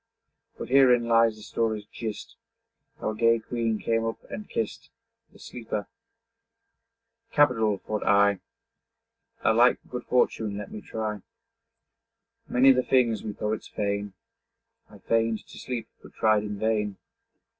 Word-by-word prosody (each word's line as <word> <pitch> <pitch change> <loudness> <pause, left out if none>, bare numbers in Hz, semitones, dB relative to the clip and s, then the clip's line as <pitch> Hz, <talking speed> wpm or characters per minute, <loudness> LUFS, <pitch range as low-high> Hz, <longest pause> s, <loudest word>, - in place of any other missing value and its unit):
But - - -7
herein 125 -3 +5
lies 115 -1 +4
the 110 - -13
story's 110 -1 -2
gist, 110 0 -7 0.6
How - - -2
a - - -6
gay 115 +1 +4
queen 115 -1 -2
came 115 +1 0
up 115 0 -2
and 210 - -7
kist 110 -2 -4 0.4
The - - -18
sleeper. 110 -4 -5 1.5
'Capital!' 115 -8 +3
thought 105 +2 -4
I. 100 -1 +4 1.0
'A 110 - +4
like 120 +2 +5
good 125 -1 -6
fortune 110 -4 +1
let 105 - -7
me 105 - -7
try.' 105 -2 -4 1.3
Many 130 +2 +5
the 130 -1 +3
things 125 -4 +2
we 110 - -4
poets 105 +1 -3
feign. 100 -1 -3 0.8
I - - -14
feign'd 115 -1 0
to - - -11
sleep, 125 -3 -5
but - - -16
tried 110 -1 +3
in 105 -1 -5
vain. 105 -2 0
110 Hz, 135 wpm, -26 LUFS, 105-115 Hz, 1.5 s, herein